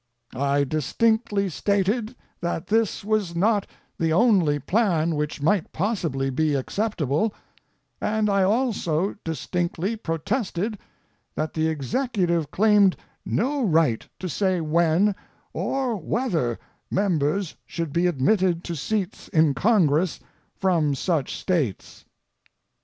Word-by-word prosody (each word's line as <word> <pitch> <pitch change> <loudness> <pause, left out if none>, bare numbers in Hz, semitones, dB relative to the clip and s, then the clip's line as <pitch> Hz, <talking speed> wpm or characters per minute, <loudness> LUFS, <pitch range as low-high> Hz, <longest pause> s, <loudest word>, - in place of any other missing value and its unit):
I 140 +2 +1
distinctly 200 - +1
stated 205 - 0 0.3
that 170 0 -2
this 220 -2 +1
was 210 -5 0
not 205 +3 +2 0.3
the 165 -1 +1
only 180 -6 +4
plan 170 - +1
which 150 -1 -3
might 190 +2 +1
possibly 160 - -1
be 150 +2 +1
acceptable; 175 - -1 0.7
and 215 0 +1
I 200 -1 +2
also 200 -5 +1
distinctly 175 +4 -2
protested 205 - -2 0.6
that 155 0 -2
the 160 0 +1
Executive 170 - 0
claimed 205 0 +4 0.3
no 270 +5 0
right 160 - +2
to 185 - -5
say 185 +1 0
when, 170 +5 +2 0.4
or 265 -3 -1
whether 175 - -1 0.3
members 180 -2 0
should 165 -3 -4
be 175 +1 +2
admitted 175 +3 +2
to 170 - -4
seats 200 +5 -3
in 155 -3 +3
Congress 175 - +2 0.4
from 165 -7 +2
such 155 -1 -1
States. 155 - -2
180 Hz, 110 wpm, -24 LUFS, 155-210 Hz, 0.7 s, only